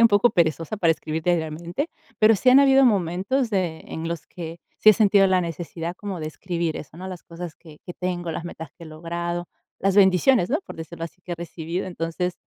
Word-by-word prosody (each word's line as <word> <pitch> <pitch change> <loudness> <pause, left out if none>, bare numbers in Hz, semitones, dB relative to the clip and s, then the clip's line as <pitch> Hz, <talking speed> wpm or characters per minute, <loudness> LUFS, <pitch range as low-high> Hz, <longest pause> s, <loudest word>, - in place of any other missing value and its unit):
Soy - - +6
un 230 - +8
poco 205 +3 +4
perezosa 165 +2 0
para 170 -4 +3
escribir 160 0 -2
diariamente, 170 - -1 0.3
pero 220 +1 +6
sí 255 +5 +1
han 260 - +8
habido 270 -1 +6
momentos 205 +5 +1
de, 180 -6 -1
en 165 +1 -5
los 170 -3 -5
que 170 -1 -8 0.2
sí - - +5
he 215 - +11
sentido 200 -1 +5
la 185 -1 +3
necesidad 170 +1 -5
como 200 -2 -6
de 155 - -4
escribir 170 0 -3
eso, 150 +2 -9
¿no? 185 - -7
Las 185 -2 -7
cosas 170 -1 -8
que 155 -3 -16
que 175 - -5
tengo, 175 -2 -3
las 165 - -5
metas 160 -3 -8
que 170 - -11
he - - -10
logrado, 170 +2 -4 0.3
las 195 0 +1
bendiciones, 190 +2 +5
¿no? 300 - +2
Por - - -8
decirlo 165 +1 -6
así, 170 +2 -11
que 175 - -6
he - - -1
recibido. 170 +1 -4
Entonces, 180 0 -2
175 Hz, 220 wpm, -24 LUFS, 165-195 Hz, 0.3 s, he